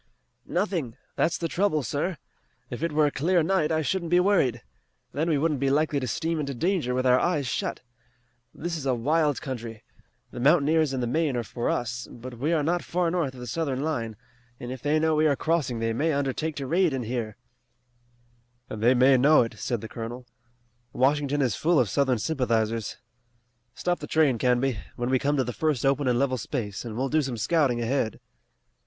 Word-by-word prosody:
"Nothing. 175 - -2 0.2
That's 170 - +1
the 165 - -2
trouble, 170 -4 +1
sir. 150 +8 -2 0.5
If 120 - -5
it 165 -1 0
were 150 0 +3
a 145 - +1
clear 170 +5 +2
night 165 -2 +1
I 160 0 +1
shouldn't 170 +3 -1
be 175 +1 +4
worried. 180 - +2 0.5
Then 160 +4 0
we 155 - +2
wouldn't 150 -1 0
be 135 0 +1
likely 150 +1 +1
to 130 - -3
steam 160 +7 -1
into 140 -2 -3
danger 160 -4 0
with 130 0 0
our 125 0 +5
eyes 160 -6 0
shut. 125 - -3 0.7
This 170 +6 -4
is 145 -4 -4
a 130 - +2
wild 150 +4 +1
country. 115 -4 -6 0.5
The - - -7
mountaineers 150 +2 +3
in 130 -2 -2
the - - 0
main 145 +1 0
are 120 - -1
for 120 +2 -3
us, 120 0 -2
but 120 0 -10
we 150 +6 0
are 160 -3 +2
not 175 +3 0
far 175 -1 0
north 160 -7 -1
of 125 - -10
the - - -6
Southern 135 +1 -2
line, 115 -8 -2 0.4
and 120 - -6
if 130 -2 -7
they 150 +2 +2
know 160 0 +2
we 155 0 +3
are 145 - +3
crossing 150 -6 0
they 115 0 -1
may 155 +8 +1
undertake 140 +3 -1
to 140 - -4
raid 170 +3 +2
in 130 -2 -2
here." 115 -2 -4 1.3
"And 110 - -5
they 120 +3 +5
may 130 +2 +5
know 145 +2 +5
it," 110 -2 -7
said 120 -4 -2
the 110 - -6
colonel. 120 +3 -7 0.7
"Washington 145 +2 +2
is 125 -5 +1
full 165 -1 +2
of 120 - +2
Southern 135 -3 +2
sympathizers. 115 -4 -1 0.8
Stop 175 0 -1
the 150 - -7
train, 145 -7 +2
Canby, 125 -1 +1 0.2
when 120 +1 -2
we 130 - +3
come 145 +2 0
to 130 - +2
the 125 0 -4
first 150 -4 0
open 135 0 +2
and 125 -1 +2
level 130 -1 +1
space, 105 -5 -4
and 115 -2 -6
we'll 135 +2 0
do 155 +3 +2
some 130 -4 -3
scouting 135 0 +1
ahead." 115 -1 -1
140 Hz, 205 wpm, -26 LUFS, 120-155 Hz, 1.3 s, our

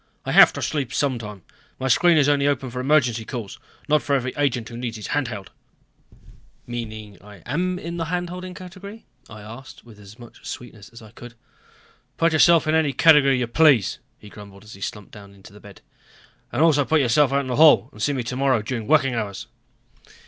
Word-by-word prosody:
"I - - -3
have - - +7
to - - -5
sleep 140 -5 -3
sometime. 115 - -3 0.3
My 130 - -3
screen 170 +6 +4
is 145 -2 +3
open 145 -1 +2
only 140 -3 -1
for 125 - -6
emergency 125 -4 +1
calls, 110 -4 -7 0.3
not 150 0 +2
for 140 - 0
every 130 -1 -2
agent 125 -6 -1
who 115 - -10
needs 120 -1 -5
his 105 - -8
hand 145 -3 0
held." 100 -5 -8 1.1
"Meaning 110 -4 -8
I 100 -3 -15
am 180 +7 -2
in 170 -1 -7
the 165 - -3
hand 175 +1 -3
holding 180 0 -8
category?" 200 +4 -11 0.2
I 110 -1 -11
asked 115 +5 -12
with 110 -3 -16
as 105 +1 -15
much 120 -2 -15
sweetness 115 -3 -9
as 115 -1 -14
I 110 - -15
could. 120 0 -13 0.8
"Put 165 0 +2
yourself 165 +1 +5
in 155 - 0
any 160 -3 +1
category 145 -5 +5
you 125 - -1
please," 125 - +3 0.2
he 105 - -15
grumbled 100 -1 -14
as 110 - -13
he 100 - -14
slumped 105 0 -7
down 100 -1 -14
in 95 - -21
the 100 +2 -15
bed. 100 -1 -15 0.7
"And 155 - +1
also 150 -3 +4
put 160 +3 +1
yourself 135 +2 +2
out 140 +1 +1
into 130 - -7
the 125 - -1
hall 155 0 +6
and 105 - -13
see 145 - 0
me 130 -3 -3
tomorrow 130 -1 0
during 115 -1 -5
working 135 -3 +3
hours." 100 -5 -4
125 Hz, 205 wpm, -22 LUFS, 110-150 Hz, 1.1 s, have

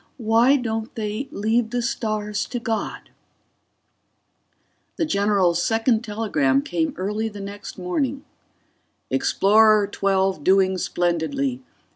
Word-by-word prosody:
Why 235 +3 +4
don't 225 -3 -3
they 215 +3 -3
leave 220 -1 0
the 245 0 -2
stars 215 -3 -2
to 245 - -4
God? 225 -1 -4 1.8
The 325 - 0
general's 200 - +2
second 225 +2 +1
telegram 175 - 0
came 165 -2 -2
early 210 +4 -2
the 205 -1 -10
next 200 +1 -8
morning: 260 +10 -2 0.9
Explorer 215 +1 +4
XII - - -9 0.4
_doing 190 +2 +3
splendidly. 180 +13 -1
215 Hz, 105 wpm, -23 LUFS, 195-230 Hz, 1.8 s, Why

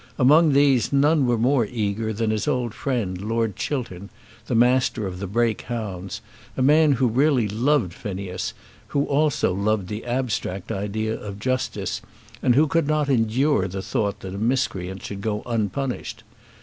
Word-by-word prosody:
Among 150 +3 +5
these 140 -3 +3
none 140 0 +3
were 120 -1 +2
more 120 0 +2
eager 110 -1 -2
than 110 +1 -1
his 110 +6 -1
old 125 -6 0
friend 110 -11 -2
Lord 110 -1 -1
Chiltern, 105 -9 -4 0.4
the 120 - -1
Master 125 -1 +3
of 90 -1 -5
the 100 - -4
Brake 115 +2 0
hounds, 100 -6 -5 0.4
a 130 - +1
man 150 +2 +5
who 130 0 +1
really 130 0 +2
loved 115 - +1
Phineas, 95 -1 -5 0.3
who 140 0 0
also 145 -8 +1
loved 100 0 0
the 105 +1 -5
abstract 120 -7 -2
idea 110 +2 -2
of 100 -3 -6
justice, 115 -4 -2 0.4
and 125 - +3
who 150 +4 +5
could 160 0 +1
not 150 -1 +1
endure 125 -2 +2
the 95 +1 -5
thought 100 +1 -2
that 95 -1 -6
a 100 - -5
miscreant 95 -6 -1
should 100 -1 -6
go 105 0 -2
unpunished. 120 +3 -3
115 Hz, 160 wpm, -23 LUFS, 100-135 Hz, 0.4 s, Among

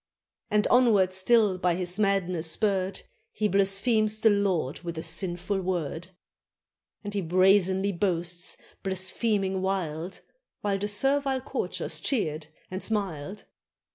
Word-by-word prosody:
And, 210 0 +2
onward 215 -7 +4
still 195 0 +3
by 180 -1 +1
his 180 +2 0
madness 185 -5 +1
spurred. 195 0 -1 0.3
He 215 - 0
blasphemes 210 +3 +2
the 220 0 +5
Lord 190 -9 0
with 170 -1 -6
a 160 - -4
sinful 175 +3 -2
word; 175 -2 -3 1.0
And 205 0 -5
he 200 - -1
brazenly 190 +2 +3
boasts, 175 -2 -1 0.2
blaspheming 190 +1 0
wild. 180 -2 -3 0.4
While 200 -1 -1
the 205 - -2
servile 270 +5 +1
courtiers 265 - -2
cheered 155 - -1 0.2
and 185 +1 -4
smiled. 195 -4 -3
190 Hz, 120 wpm, -27 LUFS, 175-205 Hz, 1.0 s, the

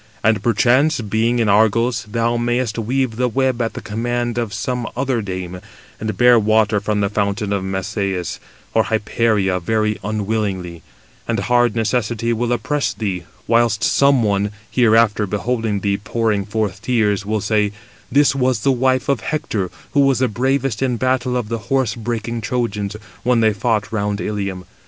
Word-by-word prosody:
And, 110 0 +3
perchance, 125 +7 +3
being 115 +2 0
in 115 -2 +1
Argos, 110 +4 +2
thou 115 +2 0
mayest 120 -1 -1
weave 120 0 -1
the 125 0 +2
web 130 0 0
at 115 - -1
the - - -7
command 120 +2 -2
of 115 -3 -2
some 125 +2 -3
other 130 -3 0
dame, 90 -2 -5 0.4
and 110 0 -3
bear 120 -1 +6
water 110 -1 +2
from 105 +1 -1
the 100 - +2
fountain 100 0 -1
of 100 - 0
Messeïs, 95 -1 -3 0.3
or 110 -2 +3
Hyperia, 105 -2 +1
very 110 +3 0
unwillingly; 100 -5 -2 0.5
and - - 0
hard 120 +2 +2
necessity 115 +1 0
will 120 +1 -1
oppress 140 +5 0
thee; 95 -5 -3 0.2
whilst 115 -2 +2
some 140 -3 +4
one, 100 -1 +1 0.2
hereafter 110 -3 +3
beholding 105 +1 -1
thee 100 0 0
pouring 110 -1 -1
forth 105 -3 -2
tears, 110 -5 +1
will 110 +1 -1
say, 105 0 +1 0.4
'This 145 +1 +4
was 130 -4 +1
the 135 - +3
wife 130 0 +1
of 140 -4 +1
Hector, 110 - -2 0.2
who 145 - +1
was 135 -2 +4
the 130 - +2
bravest 130 +1 -1
in 125 -3 +1
battle 130 0 0
of 120 -4 -2
the 115 +1 -3
horse 130 -5 +1
breaking 115 0 -3
Trojans, 105 -3 -2 0.3
when 125 -1 +2
they 110 -1 +3
fought 105 0 -1
round 105 -2 -1
Ilium. 100 -3 -3
110 Hz, 165 wpm, -19 LUFS, 105-120 Hz, 0.5 s, bear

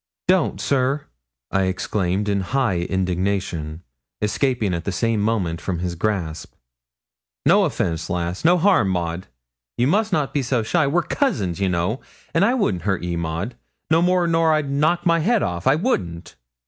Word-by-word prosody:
'Don't, 95 - +2
sir,' 135 +5 0 0.5
I 95 0 +2
exclaimed 95 +1 -1
in 100 -1 +1
high 120 -3 0
indignation, 90 -3 -2 0.4
escaping 110 -2 0
at 85 -1 -3
the 100 - -2
same 115 +2 0
moment 95 -7 0
from 95 -3 -2
his 90 +1 -3
grasp. 85 -3 -3 0.9
'No - - +5
offence, 80 -1 -2
lass; 90 +1 -2
no 175 +2 +5
harm, 180 - +3
Maud; 85 -1 -2 0.5
you 120 - +2
must 205 +9 +2
not 150 -6 0
be 145 - +1
so 125 -2 0
shy 155 +6 +1
we're 170 +5 +2
cousins, 100 - -1
you 95 -1 +1
know 90 +8 -1 0.3
an' 165 - +2
I 235 +5 +3
wouldn't 105 - 0
hurt 95 -3 -1
ye, 90 -1 -2
Maud, 85 +7 -3 0.4
no 165 +1 +5
more 180 0 +3
nor 165 -1 +3
I'd 150 -3 0
knock 155 +5 +1
my 170 -1 +4
head 215 +6 +2
off. 85 0 -2
I 135 - +5
wouldn't.' 90 - -2
105 Hz, 170 wpm, -22 LUFS, -, 0.9 s, No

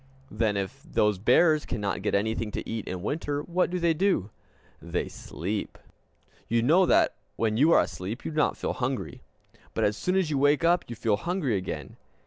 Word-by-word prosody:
Then 110 -3 0
if 100 +8 -4
those 105 - +1
bears 150 - +4
cannot 100 -4 -3
get - - 0
anything 110 +2 0
to - - -4
eat 115 -2 -4
in 90 -1 -5
winter, 145 +3 -2
what 180 +2 0
do 180 - -2
they 170 -2 +2
do? 160 - +1 0.5
They - - -2
sleep! 100 +6 -5 0.7
You 115 +1 +1
know 175 +8 +5
that - - +4 0.2
when 110 -1 0
you 150 +8 +4
are - - +6
asleep 100 +7 -5
you - - -3
do 155 - -7
not 150 - +2
feel - - -2
hungry; 130 0 -3 0.5
but - - 0
as 105 0 +2
soon 180 - -1
as 185 -5 +1
you 140 - +1
wake 145 +3 +3
up 175 +1 +3
you 120 - -6
feel 110 -2 +1
hungry 170 - -1
again. 95 -1 -5
125 Hz, 195 wpm, -27 LUFS, 105-165 Hz, 0.7 s, are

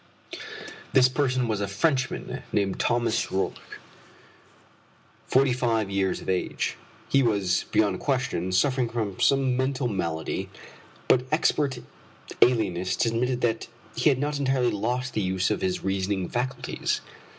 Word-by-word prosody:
This 130 -1 +7
person 130 -2 0
was 105 -2 -1
a 100 - -1
Frenchman 130 +7 -1
named 100 -2 0
Thomas 120 -2 +1
Roch, 95 +1 -1 1.7
forty 130 0 +4
five 115 -5 0
years 95 -1 0
of - - -11
age. 95 -1 -1 0.3
He 135 - +3
was, 100 -7 +1
beyond 100 -4 +2
question, 125 - -1
suffering 125 +6 +2
from 110 -5 -3
some 135 -2 +3
mental 130 0 0
malady, 85 -7 -2 0.6
but 125 0 +4
expert 145 -3 +2 0.6
alienists 95 -6 +2
admitted 120 +2 0
that 115 -1 0 0.3
he - - +3
had 135 - +3
not 145 +1 -1
entirely 130 -3 +2
lost 120 +5 -2
the 110 - 0
use 95 0 0
of - - -1
his 95 -1 -1
reasoning 95 -1 -1
faculties. 125 +1 -2
120 Hz, 130 wpm, -26 LUFS, 95-130 Hz, 1.7 s, This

